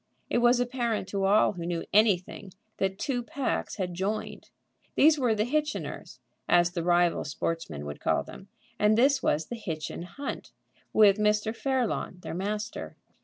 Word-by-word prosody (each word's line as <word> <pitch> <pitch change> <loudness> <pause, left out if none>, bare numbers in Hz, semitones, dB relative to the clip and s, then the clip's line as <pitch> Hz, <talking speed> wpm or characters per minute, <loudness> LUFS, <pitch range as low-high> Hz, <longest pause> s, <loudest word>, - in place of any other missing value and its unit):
It - - +3
was 240 +1 +4
apparent 240 -5 -1
to 195 -1 -1
all 205 +2 +4
who 180 -4 -7
knew 170 -1 -2
anything 195 -3 +2 0.2
that 190 0 -1
two 250 +1 -1
packs 260 +3 -3
had 185 -4 -3
joined. 195 +5 -4 0.5
These 305 0 +5
were 240 -4 +2
the 215 0 +1
Hitchiners, 300 +3 -3 0.3
as 175 0 +4
the 175 -1 -3
rival 175 0 +2
sportsmen 145 - -4
would 75 0 -6
call - - +1
them, - - -12 0.3
and 210 +1 +4
this 270 +3 +4
was 155 +1 +1
the 240 - -6
Hitchin 165 -8 -5
Hunt, 275 +11 -7 0.4
with 210 -1 +5
Mr. 210 +1 +1
Fairlawn, 255 -8 -1
their - - -5
master. 210 +5 -4
210 Hz, 160 wpm, -28 LUFS, 175-240 Hz, 0.5 s, These